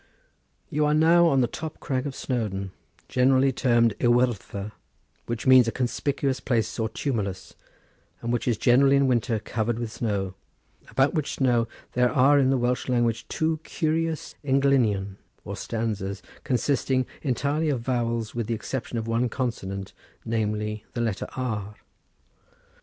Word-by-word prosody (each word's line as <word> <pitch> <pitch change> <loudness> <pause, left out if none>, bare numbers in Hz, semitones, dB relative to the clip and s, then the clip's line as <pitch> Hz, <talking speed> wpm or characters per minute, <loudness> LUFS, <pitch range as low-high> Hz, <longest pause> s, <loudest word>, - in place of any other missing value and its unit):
"You 150 -1 +2
are 150 - +3
now 170 +2 +5
on 135 -5 +3
the 120 - +2
top 160 +6 -7
crag 130 0 -2
of 135 - -6
Snowdon, 100 -7 -3 0.4
generally 130 +1 +3
termed 120 -3 +3
Y - - +3
Wyddfa, 120 -4 +1 0.6
which 120 -1 -3
means 130 -2 +7
a - - +1
conspicuous 135 +2 -1
place 120 -2 -1
or 110 0 0
tumulus, 105 -7 -3 0.7
and 120 +1 -2
which 120 0 -1
is 120 -3 +2
generally 135 +4 +5
in 140 0 +4
winter 120 -2 +1
covered 110 +2 -2
with 115 -2 -4
snow; 100 -5 -2 0.6
about 135 +1 +2
which 155 -4 -1
snow 120 -3 +2 0.2
there 125 0 +2
are 140 +3 +5
in 130 -1 +3
the 135 - +3
Welsh 125 +1 -1
language 120 -2 +1
two 160 0 0
curious 160 0 -2
englynion 130 -8 +2 0.3
or - - -5
stanzas 100 -4 -3 0.2
consisting 130 0 +1 0.2
entirely 145 +3 0
of 130 -5 0
vowels 115 -2 -1
with 115 -3 -3
the 115 - 0
exception 120 +1 -4
of 110 - -2
one 115 +2 +1
consonant 100 -6 -4 0.3
namely 105 -1 -2
the 120 - -1
letter 110 -4 -2
R. 110 -5 -3
120 Hz, 150 wpm, -26 LUFS, 110-135 Hz, 0.7 s, means